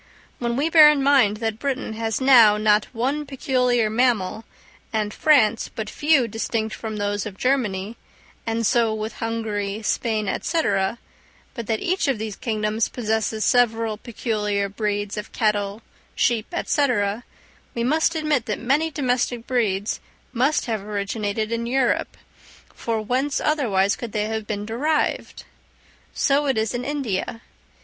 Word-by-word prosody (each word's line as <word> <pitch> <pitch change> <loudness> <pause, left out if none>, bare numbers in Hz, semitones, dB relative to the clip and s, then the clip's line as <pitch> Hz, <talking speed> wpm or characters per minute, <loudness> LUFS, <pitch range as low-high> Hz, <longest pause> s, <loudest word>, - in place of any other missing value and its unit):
When 235 -1 -1
we 285 +5 +1
bear 315 -2 +8
in 290 -2 +2
mind 260 -7 +4
that 225 -1 -3
Britain 270 -4 -2
has 225 0 -2
now 240 -6 +7
not 210 0 +3
one 265 +6 -2
peculiar 250 -4 +1
mammal, 220 -2 0 0.5
and 215 -1 -1
France 235 -8 +3
but 215 -2 -4
few 295 -5 +3
distinct 220 0 -2
from 220 -1 -5
those 205 +1 -2
of 195 -2 -9
Germany, 225 -5 -1 0.5
and 225 0 0
so 225 0 +2
with 215 0 -5
Hungary, 220 -2 -3
Spain, 215 -1 -1
&c., 330 -1 0 0.9
but 235 -4 -6
that 220 -1 -1
each 370 -2 0
of 270 -4 +1
these 215 -1 -5
kingdoms 215 0 -1
possesses 220 -2 -1
several 230 -3 +2
peculiar 210 -3 -2
breeds 205 0 -2
of 210 - -6
cattle, 210 -1 -1 0.3
sheep, 225 -3 +1
&c., 290 -2 +2 0.9
we 235 - -1
must 315 +6 +2
admit 305 -6 0
that 210 - -1
many 285 +7 +1
domestic 250 -4 -1
breeds 210 -5 0 0.3
must 265 +5 +1
have 220 -4 -2
originated 205 +1 -3
in 230 0 -2
Europe; 255 0 0 0.6
for 225 -2 -3
whence 260 +6 0
otherwise 205 -10 +1
could 235 -3 -7
they 210 -1 0
have 220 -1 -4
been 205 -1 -3
derived? 285 +8 -1 0.7
So 285 0 +1
it 265 -4 +1
is 220 +1 0
in 245 0 -3
India. 245 -6 -3
225 Hz, 145 wpm, -23 LUFS, 215-255 Hz, 0.9 s, bear